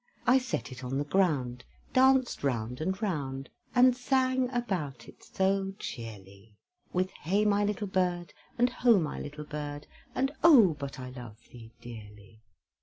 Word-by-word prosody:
I 255 Hz, +2 st, +6 dB
set 255 Hz, -, -4 dB
it 130 Hz, 0 st, -9 dB
on 130 Hz, +2 st, -2 dB
the 145 Hz, -, 0 dB
ground, 145 Hz, -8 st, 0 dB, 0.3 s
Danced 260 Hz, -, +4 dB
round 125 Hz, -1 st, -2 dB
and 190 Hz, +4 st, -1 dB
round, 135 Hz, -8 st, -3 dB, 0.2 s
And 250 Hz, 0 st, +6 dB
sang 260 Hz, 0 st, +1 dB
about 180 Hz, -, -3 dB
it -, -, -15 dB
so 195 Hz, 0 st, 0 dB
cheerly, 105 Hz, -2 st, -9 dB, 0.3 s
With 185 Hz, +1 st, 0 dB
"Hey, 200 Hz, +7 st, 0 dB
my 205 Hz, 0 st, +3 dB
little 210 Hz, 0 st, -1 dB
bird, 180 Hz, -2 st, -1 dB, 0.2 s
And 245 Hz, +1 st, +3 dB
ho! 235 Hz, -4 st, +4 dB
my 155 Hz, -4 st, -3 dB
little 150 Hz, +1 st, -7 dB
bird, 145 Hz, -1 st, -6 dB, 0.3 s
And 270 Hz, +1 st, +1 dB
oh! 235 Hz, -, +7 dB
but 140 Hz, 0 st, -6 dB
I 125 Hz, 0 st, -7 dB
love 120 Hz, -4 st, -10 dB
thee 115 Hz, -2 st, -12 dB
dearly!" 110 Hz, -2 st, -12 dB
155 Hz, 155 wpm, -29 LUFS, 125-210 Hz, 0.3 s, oh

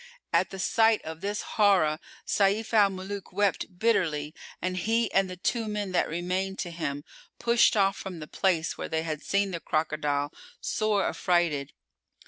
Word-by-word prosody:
At -, -, +3 dB
the 195 Hz, -, -7 dB
sight 225 Hz, +3 st, +3 dB
of 160 Hz, +1 st, -7 dB
this 205 Hz, +1 st, -2 dB
horror 185 Hz, -8 st, +3 dB, 0.3 s
Sayf 205 Hz, +3 st, +1 dB
al 205 Hz, -3 st, +6 dB
Muluk 195 Hz, +1 st, -6 dB
wept 195 Hz, -1 st, 0 dB
bitterly 160 Hz, -9 st, +1 dB, 0.3 s
and 185 Hz, 0 st, -2 dB
he 225 Hz, +4 st, +1 dB
and 195 Hz, -1 st, +3 dB
the 180 Hz, -, -7 dB
two 225 Hz, +5 st, -1 dB
men[FN#408] 210 Hz, -2 st, -3 dB
that 180 Hz, -, +1 dB
remained 185 Hz, +3 st, -2 dB
to 175 Hz, -, -4 dB
him 145 Hz, -4 st, -4 dB, 0.3 s
pushed 235 Hz, -1 st, +4 dB
off 195 Hz, 0 st, +3 dB
from 185 Hz, -3 st, -6 dB
the 155 Hz, -, -6 dB
place 170 Hz, -1 st, 0 dB
where -, -, -4 dB
they 160 Hz, 0 st, -1 dB
had 155 Hz, -2 st, -3 dB
seen 200 Hz, 0 st, 0 dB
the 170 Hz, -, -3 dB
crocodile, 150 Hz, -2 st, -1 dB, 0.3 s
sore 215 Hz, -2 st, 0 dB
affrighted. 165 Hz, -6 st, 0 dB
185 Hz, 165 wpm, -28 LUFS, 160-205 Hz, 0.3 s, al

